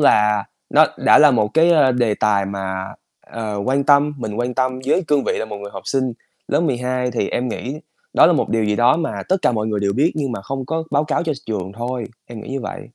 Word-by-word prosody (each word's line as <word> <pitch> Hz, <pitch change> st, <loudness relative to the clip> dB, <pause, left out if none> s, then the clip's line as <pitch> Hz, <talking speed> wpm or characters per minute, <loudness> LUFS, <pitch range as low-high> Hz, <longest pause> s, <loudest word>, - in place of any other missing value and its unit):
là 105 Hz, -7 st, +3 dB, 0.3 s
nó -, -, +6 dB
đã -, -, +5 dB
là 150 Hz, -1 st, +7 dB
một 110 Hz, -4 st, +2 dB
cái, 165 Hz, +2 st, +5 dB
ơ, 145 Hz, -6 st, +4 dB
đề 120 Hz, -4 st, +1 dB
tài 100 Hz, -2 st, +1 dB
mà, 95 Hz, -1 st, -4 dB, 0.4 s
ờ, 110 Hz, -3 st, -6 dB
quan 135 Hz, +2 st, +1 dB
tâm 145 Hz, +1 st, +4 dB
mình 110 Hz, -3 st, -5 dB
quan 125 Hz, 0 st, -2 dB
tâm 130 Hz, 0 st, 0 dB
với 185 Hz, +6 st, +2 dB
cương 145 Hz, -2 st, +2 dB
vị -, -, 0 dB
là -, -, -2 dB
một 105 Hz, -2 st, -7 dB
người 100 Hz, 0 st, -8 dB
học -, -, -8 dB
sinh 130 Hz, -2 st, 0 dB, 0.4 s
lớp -, -, +2 dB
12 125 Hz, -4 st, -1 dB
thì 120 Hz, -, -1 dB
em 125 Hz, +1 st, -2 dB
nghĩ 130 Hz, +4 st, -5 dB, 0.4 s
đó -, -, +7 dB
là 175 Hz, -, +4 dB
một -, -, 0 dB
điều 115 Hz, -1 st, +1 dB
gì 105 Hz, 0 st, 0 dB
đó 120 Hz, +4 st, +4 dB
mà 165 Hz, -4 st, -3 dB
tất 190 Hz, -, +3 dB
cả -, -, +3 dB
mọi 110 Hz, -1 st, -1 dB
người 105 Hz, -2 st, -1 dB
đều 100 Hz, 0 st, 0 dB
biết 145 Hz, -, +2 dB
nhưng 140 Hz, -5 st, -2 dB
mà 100 Hz, -, -5 dB
không 135 Hz, +3 st, -5 dB
có 160 Hz, 0 st, -2 dB
báo 145 Hz, +1 st, +2 dB
cáo 155 Hz, -, -1 dB
cho 160 Hz, -2 st, -1 dB
trường 100 Hz, -3 st, -4 dB
thôi, 120 Hz, +1 st, -4 dB, 0.2 s
em 115 Hz, -2 st, -9 dB
nghĩ -, -, -10 dB
như 135 Hz, 0 st, -3 dB
vậy. -, -, -6 dB
125 Hz, 255 wpm, -20 LUFS, 105-140 Hz, 0.4 s, là